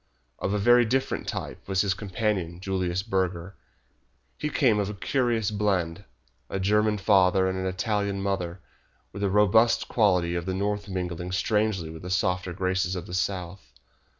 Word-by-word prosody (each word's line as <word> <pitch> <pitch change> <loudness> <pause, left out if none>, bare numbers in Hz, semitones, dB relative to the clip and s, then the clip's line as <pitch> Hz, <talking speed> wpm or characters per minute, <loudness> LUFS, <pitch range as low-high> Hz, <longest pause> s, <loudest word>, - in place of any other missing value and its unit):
Of - - -1
a - - +2
very 120 +4 +5
different 130 +3 -1
type - - -5
was 95 -1 +2
his 100 -1 +1
companion, 95 -4 -2
Julius 95 -1 -1
Burger. 95 -3 -2 0.8
He 150 - -3
came 125 -8 +3
of 100 -1 -1
a 105 - -5
curious 115 -1 0
blend, 100 -3 -1 0.4
a 95 - -3
German 105 +2 +2
father 95 -1 +4
and 95 - -1
an 95 0 -2
Italian 100 +1 -1
mother, 95 -3 -2 0.5
with 100 - -6
the 100 - +1
robust 105 +4 +4
qualities 90 -6 +2
of 85 +1 -4
the 95 - -1
North 100 +1 -2
mingling 90 -1 -4
strangely 105 -3 0
with 80 - -9
the 90 - -7
softer 90 0 0
graces 95 +1 -1
of 90 - -5
the - - -9
South. 90 -1 -3
95 Hz, 165 wpm, -26 LUFS, 90-105 Hz, 0.8 s, very